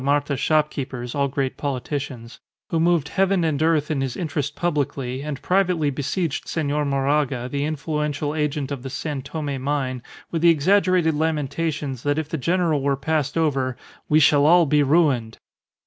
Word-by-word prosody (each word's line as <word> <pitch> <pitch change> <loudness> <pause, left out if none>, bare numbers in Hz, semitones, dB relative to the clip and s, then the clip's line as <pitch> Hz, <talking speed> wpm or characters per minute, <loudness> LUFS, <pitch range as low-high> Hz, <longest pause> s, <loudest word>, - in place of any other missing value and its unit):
Marta 145 +1 +1
shopkeepers, 135 -4 -1
all 140 -1 +1
great 135 -1 -2
politicians), 135 -3 -4 0.3
who 165 - +1
moved 165 -3 +2
heaven 195 -2 +2
and 155 -3 0
earth 160 -2 +2
in 140 -3 0
his 135 -2 -3
interest 150 -4 -3
publicly, 140 -6 -2
and 145 -2 -5
privately 180 -6 +2
besieged 145 +4 -2
Senor 150 -2 -1
Moraga, 140 -2 0
the 140 +2 -2
influential 150 -1 -2
agent 150 -2 -2
of 140 -3 -4
the 135 - -6
San 145 +1 -4
Tome 140 -1 -4
mine, 130 -3 -2 0.3
with 165 - -1
the 170 - +6
exaggerated 180 +1 +3
lamentations 150 -3 -2
that 145 +2 0
if 155 -1 -2
the 160 - -2
general 165 -1 +1
were 140 0 +1
passed 150 +1 -1
over, 135 -6 0 0.3
"We 150 - +5
shall 145 -1 +5
all 175 +1 +6
be 150 0 +3
ruined." 140 -7 +2
145 Hz, 165 wpm, -23 LUFS, 135-160 Hz, 0.3 s, the